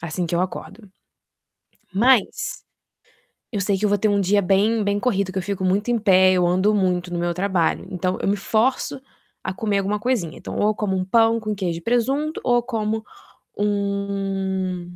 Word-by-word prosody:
assim 170 +1 -3
que 170 - -3
eu 170 - +2
acordo. 190 +2 -6 1.0
Mas 235 +2 +2 0.9
eu 205 - -1
sei 195 0 +1
que 210 - -3
eu - - +4
vou 205 0 +2
ter 215 - +2
um 205 -1 +2
dia 200 +2 +3
bem 210 +4 +2
bem 205 0 0
corrido, 200 -6 0
que 190 - -2
eu - - -2
fico 195 0 -3
muito 200 +5 +1
em 235 - +2
pé, 185 -3 +5
eu 180 -1 +2
ando 185 +4 +2
muito 180 -2 0
no 175 - -2
meu 175 0 -1
trabalho, 185 -2 0
então, 185 0 -2
eu - - -1
me 205 - +2
forço 225 +6 0 0.4
a 185 - -3
comer 205 -2 0
alguma 200 +2 -1
coisinha. 220 -9 -1
Então, - - -7
ou 210 - +2
eu 215 - +1
como 195 -3 -1
um 185 - -1
pão 225 +3 +3
com 215 -1 -3
queijo 175 -4 -2
e - - -13
presunto, 270 - 0
ou 245 -1 +3
eu 240 - +2
como 220 -2 -2 0.6
um 195 -3 -2
200 Hz, 200 wpm, -22 LUFS, 185-215 Hz, 1.0 s, pé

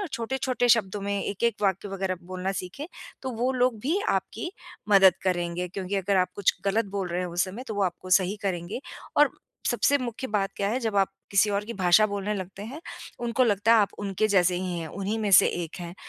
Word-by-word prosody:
और 400 - -3
छोटे-छोटे 245 +1 -1
शब्दों 205 -2 -3
में 200 0 -1
एक-एक 215 +3 0
वाक्य 195 +1 0
वगैरह 190 -1 -2
बोलना 185 +2 -3
सीखें, 235 - -7 0.4
तो 260 - -3
वो 250 +3 +1
लोग 250 -3 +1
भी 320 - 0
आपकी 350 - -2 0.4
मदद 195 -3 +7
करेंगे 175 -1 -1
क्योंकि 195 +2 -3
अगर 195 +1 +1
आप 180 0 +3
कुछ 205 - +2
गलत 220 +4 +2
बोल 190 -2 -1
रहे 175 +1 -2
हैं 180 - -2
उस 175 0 +1
समय 200 +7 -7
तो 215 - -3
वो 200 - 0
आपको 185 +1 -4
सही 190 +3 -2
करेंगे 185 +4 -3 0.4
और 295 -1 +6 0.4
सबसे 285 - +3
मुख्य 245 0 -4
बात 200 -2 0
क्या 200 0 0
है 240 +4 0
जब 220 -3 -2
आप 195 -1 +4 0.2
किसी 200 +1 +4
और 200 0 -1
की 235 - -5
भाषा 185 +3 +5
बोलने 205 0 -3
लगते 190 +1 -6
हैं, 265 +9 -7 0.4
उनको 240 +2 +2
लगता 210 +1 +3
है - - +6
आप 200 - +1
उनके 200 +1 0
जैसे 180 -3 +3
ही 180 -1 -3
हैं, 165 - -5
उन्हीं 200 +6 -3
में 210 -2 -1
से - - +8
एक 170 -2 -3
हैं 175 0 -7
200 Hz, 220 wpm, -26 LUFS, 185-225 Hz, 0.4 s, से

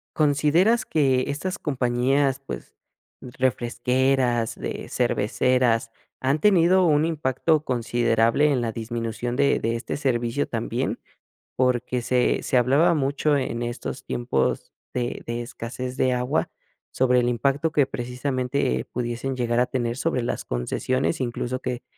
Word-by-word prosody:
¿Consideras 155 - +3
que 135 -4 +2
estas 185 +8 -3
compañías, 135 0 +1
pues - - -7 0.5
refresqueras, 125 -1 0
de - - -5
cerveceras, 120 0 +1 0.3
han 135 +4 +1
tenido 185 0 +4
un 150 -1 +3
impacto 155 0 +1
considerable 120 +2 +2
en 135 - +1
la 115 - -1
disminución 115 +1 -4
de 140 +1 +3
de 115 +1 -1
este 115 - -4
servicio 120 - 0
también? - - -2 0.6
Porque 125 -1 +1
se 125 +1 +1
se 130 - +1
hablaba 135 +8 +4
mucho 145 0 +1
en 120 -3 -3
estos 120 +2 -5
tiempos 65 - -1 0.2
de 120 -1 -2
de 115 0 -3
escasez 125 +2 -6
de 130 -1 +2
agua, 125 +5 0 0.4
sobre 125 -1 +3
el 120 - +1
impacto 140 +6 0
que 145 -3 +3
precisamente 125 - -2
pudiesen 125 +2 -3
llegar 120 -1 0
a - - +3
tener 120 -2 -2
sobre 150 -4 0
las - - -3
concesiones, 130 - -1
incluso 125 +1 -2
que 125 -2 -4
125 Hz, 130 wpm, -24 LUFS, 120-140 Hz, 0.6 s, tenido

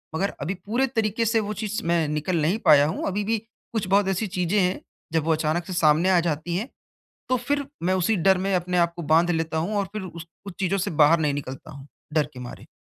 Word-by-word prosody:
मगर 195 +5 0
अभी 160 +7 -2
पूरे 245 +6 +1
तरीक़े 225 -2 0
से 225 +1 +2
वो 210 -1 -3
चीज़ 215 0 -2
मैं 170 -2 +2
निकल 155 +3 -1
नहीं 170 +8 +1
पाया 145 -1 +7
हूँ, 160 - -3
अभी 200 +2 -1
भी 225 +2 0 0.4
कुछ 220 -5 -1
बहुत 200 +1 +3
ऐसी 195 +3 -1
चीज़ें 180 +2 0
हैं, 180 +1 0 0.3
जब 160 -2 +2
वो 165 - +2
अचानक 160 +2 -1
से 185 - -4
सामने 165 +1 +3
आ 180 - +5
जाती 160 +3 -3
हैं 220 +8 -4 0.6
तो 255 - +2
फिर 285 +3 -2 0.2
मैं 185 +2 +2
उसी 185 +4 +1
डर 190 +1 +3
में 195 0 +1
अपने 180 0 0
आप 170 -1 +2
को 170 - -5
बाँध 165 +3 +3
लेता 160 -1 -1
हूँ 180 +7 -2
और 200 - 0
फिर 215 - -4
उस 170 -2 -8 0.2
उस 195 - -6
चीज़ों 195 +1 +1
से 195 +2 -1
बाहर 160 +3 +6
नहीं 150 -2 +1
निकलता 135 +1 -7
हूँ, 140 -2 -11 0.3
डर 155 -2 +3
के - - -9
मारे। 125 - -9
180 Hz, 245 wpm, -24 LUFS, 160-205 Hz, 0.6 s, पाया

